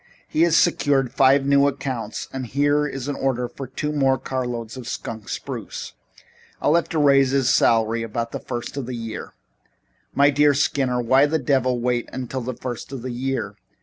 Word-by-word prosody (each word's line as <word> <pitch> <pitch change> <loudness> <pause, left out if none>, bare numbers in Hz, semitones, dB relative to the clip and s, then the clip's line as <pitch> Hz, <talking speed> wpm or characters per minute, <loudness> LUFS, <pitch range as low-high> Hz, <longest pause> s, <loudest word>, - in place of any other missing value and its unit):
"He 155 - 0
has 170 -1 +5
secured 135 -7 +2
five 135 +1 +4
new 140 0 +4
accounts 130 -5 -4
and 130 -2 -4
here 145 +4 +2
is 135 -2 -5
an 145 - -1
order 125 -2 -1
for 135 +2 -8
two 150 +4 -3
more 135 -3 +2
carloads 120 -3 -4
of 125 -2 -8
skunk 110 -4 -6
spruce. - - -6 0.7
I'll 150 - +2
have 170 0 +2
to 165 - -2
raise 140 -3 +5
his 135 -1 +2
salary 115 0 +3
about 115 +1 -3
the - - -4
first 120 0 -6
of 135 -4 -4
the 130 - -4
year. 115 -2 -7 0.8
"My 140 +1 +5
dear 145 0 +4
Skinner, 135 -3 +1
why 130 +4 +4
the 160 +2 +1
devil 130 -3 +1
wait 120 0 -1
until 130 0 -4
the 125 +1 -4
first 125 0 -6
of 130 -4 -6
the 130 - -4
year? 120 -5 -3
130 Hz, 185 wpm, -22 LUFS, 120-140 Hz, 0.8 s, has